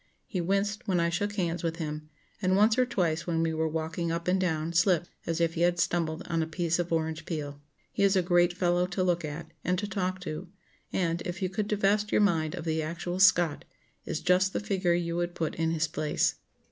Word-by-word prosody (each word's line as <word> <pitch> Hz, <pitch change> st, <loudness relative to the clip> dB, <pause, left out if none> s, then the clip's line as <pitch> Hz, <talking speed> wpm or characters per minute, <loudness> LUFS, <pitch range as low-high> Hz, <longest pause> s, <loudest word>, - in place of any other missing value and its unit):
He 185 Hz, -5 st, -3 dB
winced 200 Hz, +4 st, -1 dB
when 185 Hz, -3 st, +2 dB
I 170 Hz, 0 st, +2 dB
shook 205 Hz, +4 st, -1 dB
hands 175 Hz, -3 st, -1 dB
with 165 Hz, -1 st, -1 dB
him, 155 Hz, -2 st, -5 dB, 0.3 s
and 185 Hz, -1 st, +2 dB
once 215 Hz, +2 st, +5 dB
or 255 Hz, 0 st, +2 dB
twice 170 Hz, -8 st, 0 dB
when 165 Hz, -1 st, +1 dB
we 165 Hz, -1 st, 0 dB
were 160 Hz, 0 st, 0 dB
walking 160 Hz, +1 st, -2 dB
up 170 Hz, +1 st, -3 dB
and 185 Hz, +1 st, +2 dB
down 165 Hz, -2 st, -1 dB
slipped 175 Hz, 0 st, +2 dB, 0.2 s
as 165 Hz, 0 st, -1 dB
if 165 Hz, -1 st, +2 dB
he 165 Hz, -, -3 dB
had 175 Hz, 0 st, +3 dB
stumbled 165 Hz, -2 st, 0 dB
on 165 Hz, -1 st, 0 dB
a 160 Hz, -, -1 dB
piece 170 Hz, +1 st, -1 dB
of 175 Hz, -1 st, -2 dB
orange 160 Hz, -1 st, -1 dB
peel. 145 Hz, -3 st, -5 dB, 0.3 s
He -, -, -3 dB
is 200 Hz, 0 st, +4 dB
a 185 Hz, -, +3 dB
great 175 Hz, 0 st, +4 dB
fellow 175 Hz, 0 st, +1 dB
to 185 Hz, +1 st, -1 dB
look 175 Hz, -1 st, +1 dB
at, 155 Hz, +2 st, -6 dB
and 180 Hz, +1 st, +1 dB
to 205 Hz, +3 st, -2 dB
talk 185 Hz, -1 st, -2 dB
to; 180 Hz, +1 st, -5 dB, 0.4 s
and, 170 Hz, -2 st, 0 dB
if 180 Hz, +2 st, -4 dB
you 185 Hz, -, +1 dB
could 205 Hz, +2 st, -2 dB
divest 210 Hz, 0 st, +1 dB
your -, -, +4 dB
mind 165 Hz, -5 st, +2 dB
of 170 Hz, -2 st, -6 dB
the 160 Hz, -1 st, 0 dB
actual 170 Hz, +3 st, -4 dB
Scott, 175 Hz, -5 st, +4 dB, 0.4 s
is -, -, -3 dB
just 185 Hz, +1 st, +3 dB
the -, -, 0 dB
figure 190 Hz, -4 st, +1 dB
you 170 Hz, -1 st, -1 dB
would 175 Hz, 0 st, -2 dB
put 160 Hz, -, -2 dB
in 165 Hz, 0 st, 0 dB
his 165 Hz, 0 st, +1 dB
place." 155 Hz, -1 st, 0 dB
175 Hz, 230 wpm, -29 LUFS, 165-185 Hz, 0.4 s, once